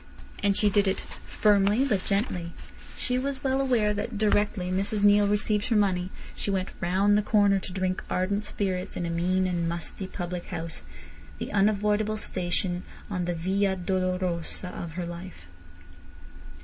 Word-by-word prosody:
And 200 -1 +3
she 205 -1 +4
did 205 0 +3
it 190 - +1
firmly 210 +4 +2
but 205 -9 +1
gently. 185 -5 -1 0.4
She 250 0 0
was 275 +1 -3
well 265 0 +2
aware 235 -6 +2
that 210 +2 -3
directly 205 -3 +1
Mrs 200 +2 0
Neale 205 0 +6
received 210 0 +1
her 230 - +1
money 185 -3 +2 0.3
she - - -3
went 190 -1 0
round 190 +3 +3
the 210 - +4
corner 205 -2 +3
to 185 - -7
drink 185 0 -1
ardent 200 +3 0
spirits 185 -3 -2
in 175 - -2
a 170 - -2
mean 180 +2 +1
and 175 -2 0
musty 170 +3 -4
public 180 -1 -5
house—the 75 - -7
unavoidable 210 +1 +2
station 180 -2 -1 0.3
on 180 -3 -1
the 175 0 -1
via 190 +3 +1
dolorosa 180 -2 -1
of 170 -2 -6
her 175 +1 -3
life. 170 - -8
190 Hz, 155 wpm, -27 LUFS, 180-205 Hz, 0.4 s, Neale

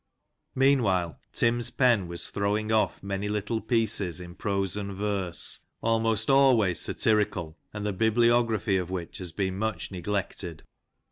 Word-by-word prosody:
Meanwhile, 110 - +2
Tim's 120 0 +1
pen 120 -8 +3
was 85 0 -5
throwing 105 +2 0
off" 110 -3 +1
many 100 +1 -3
little 105 +2 -1
pieces, 110 -6 0
in 90 -1 -9
prose 100 -1 -1
and 100 -1 -4
verse, 95 -3 -2 0.2
almost 115 -1 +1
always 130 - +4
satirical, 100 -7 0
and 105 0 -5
the 105 - 0
bibliography 115 -1 +3
of 90 -2 -3
which 95 +2 -5
has 90 -3 -5
been 95 +1 -2
much 110 -6 -2
neglected. 95 -3 -4
105 Hz, 135 wpm, -27 LUFS, 95-115 Hz, 0.2 s, always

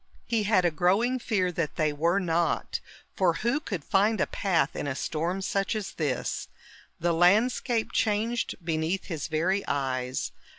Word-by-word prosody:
He 225 -3 0
had 195 -4 +3
a 175 - +3
growing 200 +10 +2
fear 195 -6 0
that 165 -3 -2
they 155 -2 +1
were 165 +5 +1
not, 170 -2 0 0.4
for 180 -3 +3
who 235 - 0
could 195 - -5
find 210 +4 +2
a - - +3
path 165 -8 0
in - - -3
a 130 - -2
storm 170 +7 -2
such 195 +2 0
as 200 -2 -3
this? 145 -8 -2 0.5
The 170 0 +1
landscape 220 +6 +3
changed 225 +3 0
beneath 165 +3 -1
his 160 -6 -4
very 175 +5 +1
eyes. 130 -2 -1
180 Hz, 160 wpm, -27 LUFS, 160-210 Hz, 0.5 s, had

